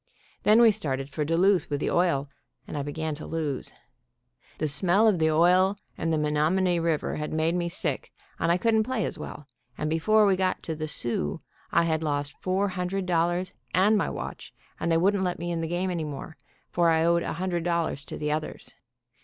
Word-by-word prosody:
Then 215 +2 +5
we 225 - +7
started 140 -9 -3
for 150 - -2
Duluth 175 +5 +2
with 145 -1 -1
the - - -1
oil, 170 -6 +2 0.4
and - - -7
I 145 - -1
began 155 +2 -3
to 150 - -7
lose. 155 -5 -2 0.9
The 155 - -1
smell 175 +9 +4
of 200 -6 +3
the 160 0 +3
oil 180 +5 +4 0.2
and 165 0 -2
the 160 - +2
Menomonee 160 +4 +1
river 165 -2 -1
had 150 0 -4
made 160 +1 +1
me 175 -1 -1
sick, 175 - -3 0.3
and 165 - +2
I 175 - +3
couldn't 220 +3 +2
play 220 -2 -1
as 175 - -5
well, 150 -1 -8 0.3
and 155 0 -2
before 210 +7 +4
we 195 -2 +4
got 185 0 -1
to 160 - -4
the 155 0 -4
"Soo" 120 - -2 0.3
I 170 - +4
had 160 -1 0
lost 145 -2 -2
four 190 +2 0
hundred 185 +1 -2
dollars 175 +1 0 0.2
and 200 +4 +4
my 210 - +1
watch, - - -7 0.2
and 170 - -1
they 165 - +4
wouldn't 195 +3 +2
let 180 -1 -1
me 175 +1 -4
in 165 -1 -2
the 165 - -2
game 180 +3 -1
any 170 -3 -2
more, 150 +2 -7 0.4
for 170 -1 +3
I 160 0 +3
owed 170 0 +3
a - - -3
hundred 175 0 -2
dollars 170 -4 -1
to - - -7
the 150 0 -2
others. 155 +1 -4
170 Hz, 210 wpm, -27 LUFS, 155-185 Hz, 0.9 s, we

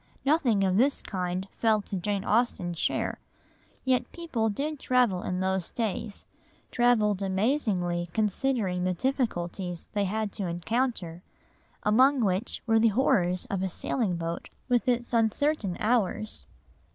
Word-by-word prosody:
Nothing 270 -9 +3
of 190 0 +2
this 270 +5 +3
kind 185 0 -3
fell 220 -2 +3
to 200 - -5
Jane 195 +2 -2
Austen's 195 -7 +1
share. - - -1 0.7
Yet 255 -1 +1
people 255 -11 -1
did 290 +7 -3
travel 245 -10 +2
in 180 0 -2
those 190 -1 -1
days, 215 -2 -3 0.5
travelled 215 -5 +3
amazingly 190 - 0
considering 210 -2 0
the 185 0 0
difficulties 180 -8 -2
they 205 -1 +1
had 215 +2 -2
to 195 -3 -3
encounter, 175 -1 -2 0.6
among 255 +6 +4
which 195 +1 -1
were 225 -1 +4
the 230 - +5
horrors 185 -6 +2
of 195 -2 -1
a 190 - -1
sailing 195 +1 -1
boat 165 0 -4 0.2
with 245 0 +1
its 240 -1 0
uncertain 225 - +1
hours. 215 - 0
210 Hz, 135 wpm, -28 LUFS, 185-245 Hz, 0.7 s, the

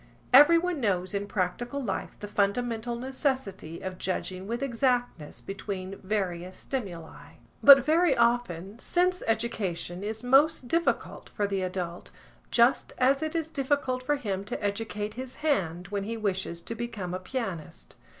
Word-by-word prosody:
Everyone 335 +3 +6
knows 185 -4 0
in 200 0 -2
practical 210 +8 -2
life 215 -8 -4
the 205 - -5
fundamental 225 +3 0
necessity 255 - -3
of 185 -1 -6
judging 185 0 -3
with 235 +4 -2
exactness 245 - -1
between 195 -1 -5
various 185 -3 -2
stimuli. 185 -11 -6 0.3
But 275 -2 +9
very 320 -2 +3
often 235 -4 +1
sense 360 +4 +1
education 200 -6 -2
is 220 +2 -4
most 270 +1 +4
difficult 335 +6 -1
for 205 - -1
the 200 -1 -1
adult, 180 -2 -4 0.4
just 240 +2 +3
as 270 +3 +3
it 315 +1 -3
is 320 -1 -2
difficult 270 -3 0
for 290 +3 +1
him 200 -8 -3
to 210 - -5
educate 210 0 -2
his 255 +1 -7
hand 180 - 0
when 200 -1 -2
he 230 +2 -3
wishes 190 -5 -2
to - - -4
become 230 -6 -5
a 185 - -2
pianist. 180 - -5
220 Hz, 145 wpm, -28 LUFS, 190-260 Hz, 0.4 s, But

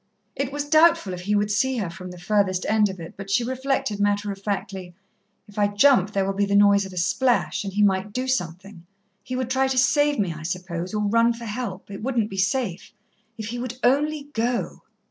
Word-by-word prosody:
It 275 0 -2
was 290 +1 -3
doubtful 315 - +4
if 180 - -6
he 205 +3 0
would 205 0 +1
see 260 +5 +1
her 195 -7 -2
from 185 +1 -9
the 180 - -10
furthest 190 0 0
end 215 -1 +3
of 190 -1 -7
it, 165 0 -8
but 195 0 -9
she 200 +5 +2
reflected 260 -4 -2
matter 205 0 +1
of 195 0 -8
factly: 195 -3 -4 0.5
"If 205 0 -8
I 205 - +4
jump 205 -1 +4
there 195 -2 0
will 195 - -1
be 200 +1 0
the 200 - +1
noise 200 -1 +5
of 190 - -12
a - - -10
splash 235 +10 +1
and 195 - -4
he 205 +2 +1
might 195 +1 +1
do 255 +4 -3
something 180 -5 -4 0.4
he 255 - -5
would 255 -1 -2
try 265 +1 +2
to 265 -1 -2
save 290 +3 +3
me, 190 -6 0
I 155 - -9
suppose 180 +2 -4
or 210 - 0
run 230 +3 +3
for 235 0 -9
help. 210 -3 -5
It 195 - -7
wouldn't 230 -3 -1
be 195 - -6
safe. 195 -2 -1 0.4
If 220 -1 -5
he 240 +1 -4
would 250 0 -5
only 290 +3 +1
go." 235 +1 -2
205 Hz, 225 wpm, -24 LUFS, 190-250 Hz, 0.5 s, noise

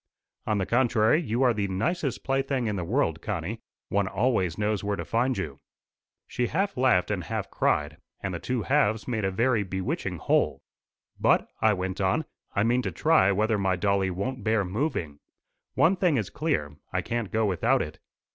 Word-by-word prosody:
"On 105 -1 +1
the 95 - 0
contrary, 120 - +3
you 125 -4 0
are 125 -2 +4
the 100 -2 -1
nicest 130 - -1
plaything 135 -2 0
in 105 -2 -1
the 90 - -2
world, 85 - 0
Connie. 100 +2 -4 0.3
One 100 -1 +1
always 100 -5 0
knows 105 -1 0
where 100 0 0
to - - -5
find 125 +3 +1
you." 75 -8 -4 0.7
She 125 -1 -1
half 195 - -1
laughed 125 -8 +3
and 90 -5 -2
half - - -4
cried, 75 +1 0 0.2
and 95 -2 -4
the 85 - -3
two 125 +2 -2
halves 120 -7 +1
made 115 -4 -1
a 95 - +2
very 115 +4 +2
bewitching 95 -1 -3
whole. - - +1 0.6
"But," - - +3
I 110 -1 +5
went 95 0 -3
on, 95 +11 +1 0.3
"I 100 - +3
mean 120 +3 +2
to - - -3
try 155 -11 +4
whether 105 +2 +1
my 95 -1 +1
dolly 100 0 +1
won't 120 +8 -3
bear 110 -2 +2
moving. 90 - -2 0.6
One 175 +4 +4
thing 175 -6 +2
is 105 -5 -2
clear, 75 - -2
I - - -1
can't 115 -4 -2
go 110 0 +1
without 95 -5 +2
it. - - -9
105 Hz, 185 wpm, -27 LUFS, 95-125 Hz, 0.7 s, I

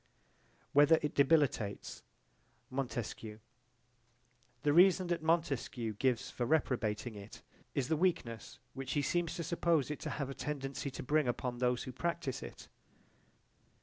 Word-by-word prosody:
Whether 145 +3 +7
it 150 - -1
debilitates 140 -8 +2 0.7
Montesquieu 120 -4 -4 1.3
The 145 - +3
reason 185 +2 +6
that 175 -2 0
Montesquieu 145 -8 0
gives 125 +2 0
for 125 - -3
reprobating 120 -6 0
it 100 0 -11 0.3
is 130 -3 0
the 160 - +2
weakness 150 -10 -1 0.2
which 135 -1 -4
he 145 - +1
seems 175 +4 0
to 170 - -3
suppose 165 -3 +1
it 150 - -4
to - - -4
have 140 -3 -3
a - - -4
tendency 140 -1 -4
to 135 - -7
bring 150 +1 +2
upon 120 0 -2
those 125 -1 +1
who 130 - -6
practice 170 -1 -2
it. - - -9
135 Hz, 140 wpm, -34 LUFS, 125-160 Hz, 1.3 s, Whether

